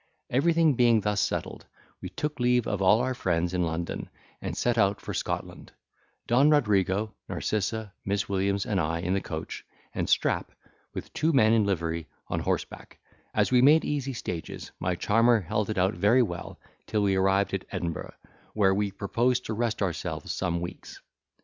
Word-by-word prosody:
Everything 160 Hz, +3 st, +3 dB
being 120 Hz, -3 st, +4 dB
thus 105 Hz, 0 st, 0 dB
settled, -, -, -3 dB, 0.3 s
we -, -, -5 dB
took 150 Hz, -1 st, -4 dB
leave 125 Hz, -1 st, +3 dB
of 100 Hz, -3 st, -2 dB
all 100 Hz, +4 st, +5 dB
our 130 Hz, +1 st, 0 dB
friends 90 Hz, -6 st, -1 dB
in 90 Hz, -, 0 dB
London, 80 Hz, +1 st, -4 dB, 0.3 s
and -, -, -4 dB
set 120 Hz, -1 st, +1 dB
out 100 Hz, -2 st, +2 dB
for -, -, -6 dB
Scotland, -, -, -4 dB, 0.5 s
Don 130 Hz, +5 st, +4 dB
Rodrigo, 105 Hz, -, +2 dB, 0.2 s
Narcissa, 110 Hz, 0 st, -2 dB
Miss 100 Hz, +1 st, -1 dB
Williams, 100 Hz, 0 st, 0 dB
and 105 Hz, -7 st, 0 dB
I, 85 Hz, +2 st, -1 dB
in 90 Hz, +2 st, -1 dB
the 100 Hz, -, 0 dB
coach, 80 Hz, -1 st, -6 dB, 0.3 s
and -, -, -2 dB
Strap, -, -, +1 dB, 0.4 s
with -, -, -7 dB
two 160 Hz, +1 st, +1 dB
men 110 Hz, -5 st, +5 dB
in 110 Hz, -2 st, +4 dB
livery, 85 Hz, -4 st, -2 dB, 0.2 s
on -, -, -1 dB
horseback; -, -, -3 dB, 0.4 s
as -, -, +2 dB
we 125 Hz, -1 st, +5 dB
made 150 Hz, +4 st, +6 dB
easy 140 Hz, -2 st, -2 dB
stages, 90 Hz, -8 st, -6 dB
my 90 Hz, 0 st, 0 dB
charmer 115 Hz, +5 st, +3 dB
held 105 Hz, +4 st, -2 dB
it 110 Hz, -, -2 dB
out 95 Hz, +1 st, +2 dB
very 105 Hz, +9 st, +4 dB
well, 85 Hz, -6 st, -6 dB, 0.3 s
till 105 Hz, -1 st, 0 dB
we 100 Hz, -1 st, +2 dB
arrived 95 Hz, +1 st, +2 dB
at 95 Hz, -, -2 dB
Edinburgh, 85 Hz, -4 st, -4 dB, 0.4 s
where 100 Hz, -3 st, +4 dB
we 100 Hz, +1 st, 0 dB
proposed 120 Hz, +6 st, 0 dB
to 110 Hz, -, -3 dB
rest 110 Hz, -1 st, -1 dB
ourselves 90 Hz, -4 st, -3 dB
some 85 Hz, -2 st, -1 dB
weeks. 85 Hz, -, -8 dB
105 Hz, 175 wpm, -27 LUFS, 95-120 Hz, 0.5 s, made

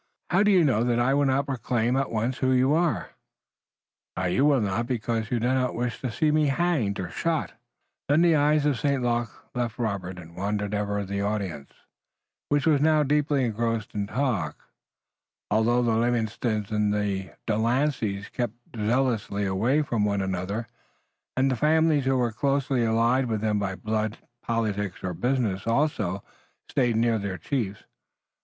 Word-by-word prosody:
"How 185 Hz, +2 st, +4 dB
do 210 Hz, -, +4 dB
you 185 Hz, -4 st, +5 dB
know 120 Hz, -5 st, +2 dB
that 120 Hz, -1 st, +1 dB
I 120 Hz, +3 st, +2 dB
will 140 Hz, 0 st, +3 dB
not 135 Hz, +1 st, +1 dB
proclaim 120 Hz, -2 st, 0 dB
at 135 Hz, 0 st, 0 dB
once 115 Hz, +3 st, -1 dB
who 130 Hz, -, +2 dB
you 130 Hz, +3 st, +3 dB
are?" 170 Hz, 0 st, 0 dB, 1.2 s
"You 130 Hz, +11 st, +2 dB
will 145 Hz, -3 st, +4 dB
not 105 Hz, +3 st, -1 dB
because 115 Hz, -2 st, -2 dB
you 120 Hz, -, 0 dB
do 120 Hz, +3 st, +1 dB
not 130 Hz, -1 st, 0 dB
wish 120 Hz, 0 st, -3 dB
to 130 Hz, -, -2 dB
see 150 Hz, +6 st, +1 dB
me 155 Hz, -1 st, +3 dB
hanged 140 Hz, -, 0 dB
or 90 Hz, -1 st, -4 dB
shot." 160 Hz, -, -1 dB, 0.6 s
Then 150 Hz, +4 st, +4 dB
the 170 Hz, -2 st, +5 dB
eyes 150 Hz, 0 st, +3 dB
of 140 Hz, -5 st, +1 dB
St. 140 Hz, -3 st, 0 dB
Luc 120 Hz, -1 st, 0 dB, 0.2 s
left 120 Hz, -2 st, -2 dB
Robert 100 Hz, -6 st, -3 dB
and 85 Hz, -1 st, -12 dB
wandered 100 Hz, +1 st, -2 dB
ever 100 Hz, -1 st, -1 dB
the 100 Hz, +1 st, -3 dB
audience, 100 Hz, -9 st, -3 dB, 0.8 s
which 145 Hz, -1 st, +2 dB
was 150 Hz, -4 st, +4 dB
now 155 Hz, 0 st, +4 dB
deeply 145 Hz, -1 st, +1 dB
engrossed 115 Hz, -1 st, -2 dB
in 100 Hz, -1 st, -2 dB
talk, 110 Hz, -, -2 dB, 0.8 s
although 120 Hz, +3 st, +3 dB
the 120 Hz, -, +2 dB
Livingstons 110 Hz, -2 st, 0 dB
and 105 Hz, -1 st, +1 dB
the 100 Hz, -3 st, -2 dB
De 110 Hz, -, 0 dB
Lanceys 115 Hz, -4 st, 0 dB
kept 120 Hz, -2 st, -3 dB, 0.2 s
zealously 115 Hz, -2 st, 0 dB
away 115 Hz, +11 st, +1 dB
from 115 Hz, -7 st, -1 dB
one 100 Hz, -1 st, 0 dB
another, 95 Hz, +4 st, -3 dB, 0.7 s
and 135 Hz, +1 st, +3 dB
the -, -, +1 dB
families 155 Hz, +1 st, +3 dB
who 135 Hz, 0 st, +2 dB
were 120 Hz, -2 st, +1 dB
closely 135 Hz, +1 st, 0 dB
allied 115 Hz, +3 st, +2 dB
with 110 Hz, -2 st, -1 dB
them 105 Hz, -1 st, +1 dB
by 95 Hz, -2 st, -2 dB
blood, 110 Hz, +1 st, -2 dB, 0.2 s
politics 105 Hz, -4 st, -2 dB
or 90 Hz, -1 st, -2 dB
business 115 Hz, -2 st, -1 dB
also, 115 Hz, -, 0 dB, 0.4 s
stayed 120 Hz, -3 st, +1 dB
near 115 Hz, 0 st, +2 dB
their 100 Hz, -2 st, -4 dB
chiefs. 100 Hz, -, -3 dB
115 Hz, 170 wpm, -26 LUFS, 105-135 Hz, 1.2 s, you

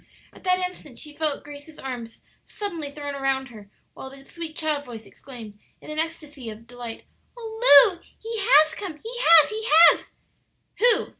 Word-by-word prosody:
At -, -, -18 dB
that 365 Hz, 0 st, +2 dB
instant 360 Hz, -8 st, -7 dB
she 300 Hz, -1 st, -9 dB
felt 305 Hz, -2 st, -3 dB
Grace's 290 Hz, +2 st, -12 dB
arms 245 Hz, -4 st, -8 dB, 0.2 s
suddenly 340 Hz, -8 st, -6 dB
thrown 285 Hz, 0 st, -7 dB
round 265 Hz, -1 st, -1 dB
her, 210 Hz, -4 st, -14 dB, 0.2 s
while 265 Hz, -, -10 dB
the 270 Hz, 0 st, -15 dB
sweet 330 Hz, -1 st, -8 dB
child 305 Hz, -2 st, -2 dB
voice 230 Hz, -4 st, -10 dB
exclaimed, 225 Hz, -6 st, -12 dB, 0.2 s
in -, -, -11 dB
an 305 Hz, -, -4 dB
ecstasy 300 Hz, -6 st, -5 dB
of 220 Hz, +1 st, -11 dB
delight, 240 Hz, -1 st, -9 dB, 0.3 s
"Oh, 445 Hz, -, +6 dB
Lu, 350 Hz, -1 st, -14 dB, 0.2 s
he 455 Hz, 0 st, -6 dB
has 315 Hz, -8 st, +5 dB
come! 360 Hz, -4 st, -7 dB
he 455 Hz, +2 st, -7 dB
has, 330 Hz, -9 st, +6 dB
he 435 Hz, +1 st, -5 dB, 0.3 s
has!" -, -, -7 dB, 0.7 s
"Who?" 480 Hz, +1 st, +3 dB
295 Hz, 170 wpm, -24 LUFS, 265-350 Hz, 0.7 s, Oh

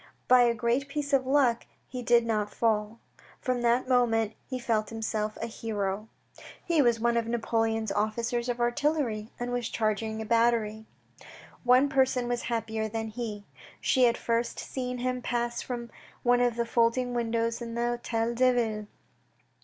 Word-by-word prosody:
By 250 Hz, 0 st, +7 dB
a 235 Hz, -1 st, +2 dB
great 235 Hz, +4 st, 0 dB
piece 285 Hz, 0 st, -4 dB
of 260 Hz, -1 st, +3 dB
luck 260 Hz, -4 st, +2 dB, 0.2 s
he 250 Hz, -, -6 dB
did 235 Hz, -1 st, +4 dB
not 215 Hz, -2 st, 0 dB
fall; 220 Hz, -1 st, 0 dB, 0.4 s
from 250 Hz, -1 st, -1 dB
that 240 Hz, +2 st, +2 dB
moment 225 Hz, -4 st, +2 dB, 0.2 s
he 255 Hz, -, -2 dB
felt 220 Hz, -3 st, 0 dB
himself 220 Hz, -1 st, -3 dB
a -, -, -2 dB
hero. 215 Hz, -2 st, -3 dB, 0.6 s
He 335 Hz, -4 st, +3 dB
was 240 Hz, -3 st, +3 dB
one 235 Hz, +1 st, +2 dB
of 230 Hz, -1 st, 0 dB
Napoleon's 225 Hz, -2 st, 0 dB
officers 235 Hz, +4 st, -1 dB
of 245 Hz, 0 st, -2 dB
artillery, 240 Hz, -3 st, 0 dB
and 245 Hz, 0 st, -3 dB
was 245 Hz, -2 st, -2 dB
charging 220 Hz, 0 st, -1 dB
a 220 Hz, -, -4 dB
battery. 225 Hz, -1 st, +1 dB, 0.8 s
One 255 Hz, +3 st, +5 dB
person 260 Hz, -3 st, +2 dB
was 245 Hz, 0 st, -1 dB
happier 220 Hz, -2 st, -2 dB
than 225 Hz, 0 st, -3 dB
he. 215 Hz, -3 st, -5 dB, 0.3 s
She 255 Hz, -1 st, +3 dB
had 235 Hz, 0 st, +3 dB
first 235 Hz, 0 st, -1 dB
seen 250 Hz, -1 st, -4 dB
him 250 Hz, 0 st, -2 dB
pass 240 Hz, -1 st, -1 dB
from 235 Hz, -2 st, -5 dB, 0.3 s
one 245 Hz, 0 st, +4 dB
of 245 Hz, -2 st, +2 dB
the 235 Hz, 0 st, 0 dB
folding 235 Hz, +2 st, +1 dB
windows 230 Hz, 0 st, -1 dB
in 230 Hz, -1 st, -5 dB
the 240 Hz, 0 st, -1 dB
Htel 230 Hz, 0 st, -1 dB
deVille. 235 Hz, -4 st, +1 dB
235 Hz, 160 wpm, -28 LUFS, 225-245 Hz, 0.8 s, By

